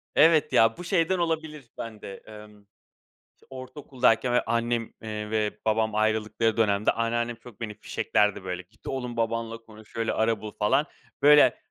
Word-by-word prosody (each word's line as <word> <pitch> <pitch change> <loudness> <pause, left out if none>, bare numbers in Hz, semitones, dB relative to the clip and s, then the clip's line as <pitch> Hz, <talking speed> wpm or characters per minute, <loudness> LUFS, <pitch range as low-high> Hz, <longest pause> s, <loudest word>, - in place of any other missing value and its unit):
Evet 160 -2 +5
ya, 115 0 +4
bu - - -7
şeyden 180 0 +1
olabilir 160 -5 -3
bende, 105 -3 -7
emm, 105 -1 -13 0.8
ç - - -28
ortaokuldayken 130 -2 0
böyle 125 - +2
annem, 115 0 -1
eee, 105 -1 -5
ve 110 -1 -1
babam 110 0 +1
ayrıldıkları 110 +1 +1
dönemde 105 -2 +2
anneannem 120 +1 -1
çok 115 -1 -16
beni 110 -2 -4
fişeklerdi 105 -1 0
böyle, 90 -1 -4
"Git 105 +5 -19
oğlum, 125 -3 -4
babanla 115 0 -2
konuş, 110 -1 -17
şöyle 115 -1 -1
ara 110 -1 0
bul," 105 -1 -6
falan 135 +8 +2 0.4
böyle 145 +1 +6
115 Hz, 155 wpm, -26 LUFS, 110-125 Hz, 0.8 s, böyle